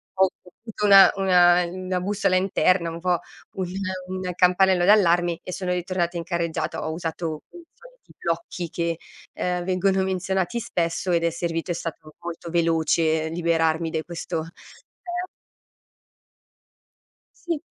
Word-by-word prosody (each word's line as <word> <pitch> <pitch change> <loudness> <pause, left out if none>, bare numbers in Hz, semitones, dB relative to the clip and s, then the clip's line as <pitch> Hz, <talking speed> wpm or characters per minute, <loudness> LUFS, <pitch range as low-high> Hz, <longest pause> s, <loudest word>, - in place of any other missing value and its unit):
ho 190 0 +4 0.3
avuto 220 -2 -3
una 195 -1 +8
una 180 -2 +5
uhm, 185 +2 -7
una 185 -1 0
bussola 195 -1 +1
interna, 185 -2 +2
un 165 0 -7
po' 180 -2 +1 0.4
un 185 - -1 0.4
un 185 0 -4
campanello 180 0 +4
d'allarme 175 -4 +4
e 180 - -6
sono 180 -1 -2
ritornata 175 -1 -2
in 170 - -3
carreggiata. 170 -3 -2
Ho 160 - -2
usato 165 -1 -4
i 350 - -12
soliti - - -19
blocchi 170 +1 -3
che, 170 0 -2 0.4
uhm, 180 -1 -1
vengono 190 +1 +1
menzionati 190 +2 -1
spesso 180 -5 -1
ed 170 -1 +2
è 170 - +3
servito, 170 +1 -3
è - - +1
stato 160 -2 -6
molto 170 0 -7
veloce 160 -1 +1
liberarmi 165 -1 +1
dai 160 0 -2
questo, 170 -1 -5
ehm 350 - -8 2.2
Sì. 330 -4 -1
175 Hz, 140 wpm, -24 LUFS, 165-190 Hz, 2.2 s, una